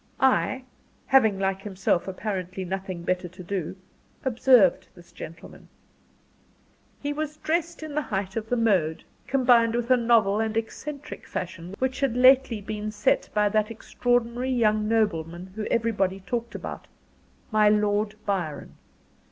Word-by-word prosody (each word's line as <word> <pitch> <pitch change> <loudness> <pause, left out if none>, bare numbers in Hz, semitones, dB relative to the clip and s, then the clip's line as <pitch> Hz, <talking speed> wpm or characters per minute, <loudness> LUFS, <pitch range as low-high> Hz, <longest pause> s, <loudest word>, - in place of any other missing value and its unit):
I, 260 0 +2 0.4
having 220 -7 +4
like 195 0 -1
himself 190 -3 -1
apparently 190 -1 -4
nothing 185 -1 -4
better 180 0 -1
to 180 +2 -12
do, 185 -2 -3 0.5
observed 235 -7 +4
this 175 - -17
gentleman. 165 +2 -11 1.3
He 290 0 -2
was 305 0 -4
dressed 335 +1 -2
in 310 -2 -6
the 300 - 0
height 195 -7 -3
of 225 -1 -4
the 245 - +2
mode, 185 -9 +1 0.2
combined 240 -4 +4
with 240 +1 -1
a 255 - +7
novel 225 -4 +3
and 220 0 -1
eccentric 285 +6 -6
fashion, 180 +1 -6
which 260 0 -1
had 275 -4 +1
been 250 - 0
lately 220 -5 +3
set 210 0 +1
by 210 0 +4
that 215 +1 +1
extraordinary 245 +2 -1
young 215 -4 +2
nobleman 180 -5 -1
whom 215 -1 -3
everybody 195 -5 0
talked 235 +4 -4
about - - -7 0.6
my 215 -1 +5
Lord 210 0 +1
Byron. 175 -8 -3
215 Hz, 140 wpm, -26 LUFS, 190-245 Hz, 1.3 s, a